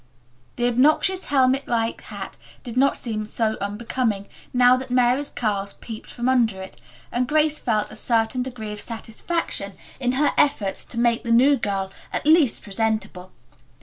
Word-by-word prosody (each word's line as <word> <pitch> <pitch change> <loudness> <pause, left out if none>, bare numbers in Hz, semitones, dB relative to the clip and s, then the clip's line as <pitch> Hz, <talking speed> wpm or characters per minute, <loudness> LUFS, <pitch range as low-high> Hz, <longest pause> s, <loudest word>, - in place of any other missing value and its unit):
The 240 - 0
obnoxious 305 +10 +3
helmet 265 0 +2
like 230 -1 -1
hat - - -7 0.3
did 240 -2 -7
not 275 +2 +3
seem 215 -3 -4
so 220 0 0
unbecoming, 210 0 -2 0.2
now 250 0 +5
that 260 0 -5
Mary's 250 +3 +2
curls 200 -3 -2
peeped 220 -2 -9
from 240 0 -3
under 235 -6 +2
it, 190 0 -10 0.3
and 245 +1 0
Grace 305 +1 +2
felt 215 -4 0
a - - -9
certain 225 +2 0
degree 240 -4 -5
of 210 - -6
satisfaction 225 - -3 0.3
in 250 -1 0
her 285 +3 +3
efforts 230 -10 +1
to 235 - -9
make 235 0 +2
the 235 - -2
new 260 +5 +6
girl 195 -5 -2 0.2
at - - -3
least 310 -5 +4
presentable. 205 -3 -2
235 Hz, 160 wpm, -23 LUFS, 215-260 Hz, 0.3 s, new